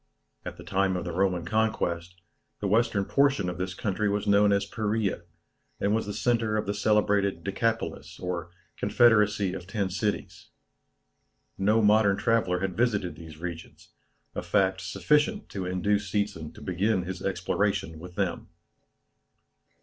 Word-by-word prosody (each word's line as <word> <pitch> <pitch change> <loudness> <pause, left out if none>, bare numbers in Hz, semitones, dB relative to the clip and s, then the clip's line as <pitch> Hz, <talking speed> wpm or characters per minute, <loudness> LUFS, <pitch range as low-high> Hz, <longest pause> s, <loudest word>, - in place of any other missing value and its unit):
At - - -7
the - - -10
time 95 -1 +1
of 90 - -4
the 85 - -3
Roman 90 -1 0
conquest, 90 -4 -1 0.4
the 100 - -2
western 110 -1 +2
portion 135 -8 +2
of 90 0 -6
this 90 -1 -3
country 100 +2 -1
was 105 +1 -1
known 100 0 +4
as 100 0 +2
Perea, 105 -4 -1 0.6
and 100 - +1
was 110 -1 0
the - - -3
centre 115 -3 +1
of 105 - -1
the 100 - -1
celebrated 100 -4 +2
Decapolis 100 -5 -2
or 90 -2 -4 0.3
confederacy 105 -5 +3
of 90 -2 -7
ten 100 -2 -2
cities. 105 +2 -3 1.1
No 105 +3 +2
modern 105 -1 +4
traveller 110 -7 +1
had 95 -2 -2
visited 100 -8 0
these 80 -2 -11
regions, 85 0 -8 0.4
a - - -3
fact 95 -1 +1
sufficient 150 - +1
to 95 -2 -4
induce 100 +2 0
Seetzen 100 -6 -2
to - - -12
begin 95 +2 0
his 95 +1 -6
exploration 95 -3 -1
with 90 +1 -10
them. 95 -4 -2
100 Hz, 150 wpm, -27 LUFS, 90-105 Hz, 1.1 s, known